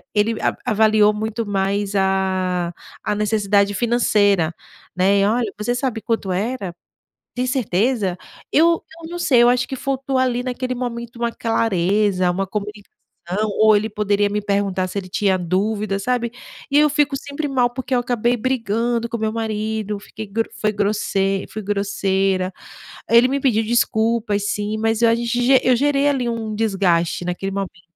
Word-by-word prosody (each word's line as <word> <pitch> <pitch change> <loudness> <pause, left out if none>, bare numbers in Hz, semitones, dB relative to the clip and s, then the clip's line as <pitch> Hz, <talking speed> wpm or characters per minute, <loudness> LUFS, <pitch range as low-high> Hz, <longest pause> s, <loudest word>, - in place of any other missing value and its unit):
ele 215 +2 +1
ava - - 0
avaliou 215 -2 +4
muito 220 +2 -3
mais 200 0 -1
a 185 -2 0 0.3
a 210 - -1
necessidade 205 -1 +1
financeira, 205 -7 +2 0.4
né? 195 +2 +3
E: - - +3
"Olha, 225 0 +1
você 210 +3 -1
sabe 245 -3 -2
quanto 220 -5 -2
era? 200 -1 -3 0.6
Tem 250 +1 -1
certeza?" 220 -5 0 0.3
Eu 335 +2 +3 0.2
eu 325 - -8
não 350 - -5
sei, 250 -8 +4
eu 240 - +6
acho 245 0 +1
que 265 - -4
faltou 270 0 -2
ali 250 -1 +1
naquele 255 0 -3
momento 235 -1 -5
uma 235 0 -1
clareza, 200 -4 +1
uma 195 +2 -1
convicção, 210 +1 -5 0.7
ou 215 0 +6
ele 210 +2 0
poderia 205 -1 +1
me 210 - -1
perguntar 200 -2 0
se 200 - -4
ele 185 - -6
tinha 190 0 +1
dúvida, 195 +3 -1
sabe, 235 +2 -1 0.4
e 285 - +4
eu 300 0 +5
fico 290 -1 +1
sempre 285 +2 -4
mal 250 -3 +2
porque 255 +1 -3
eu 245 - +3
acabei 240 0 0
brigando 235 -1 -1
com 235 - -3
meu 220 0 -1
marido 215 -2 -3
fiquei 220 +1 -9
gro 225 +3 -1
fui 215 - +2
grosse 200 -1 0
fui 215 - -6
grosseira. 195 -2 0 0.6
Ele 235 +2 +6
me 280 - 0
pediu 225 -5 +2
desculpas, 220 -2 +1
sim, 210 +1 -2
mas 225 +1 0
eu, 235 - +5
a 230 - +4
gent 240 +2 +2
eu 255 - +4
gerei 285 +2 +2
ali, 265 -4 0
um 225 -2 -3
desgaste 185 -6 +1
naquele 180 +2 -3
momento. 195 -3 -5
215 Hz, 165 wpm, -20 LUFS, 200-240 Hz, 0.7 s, eu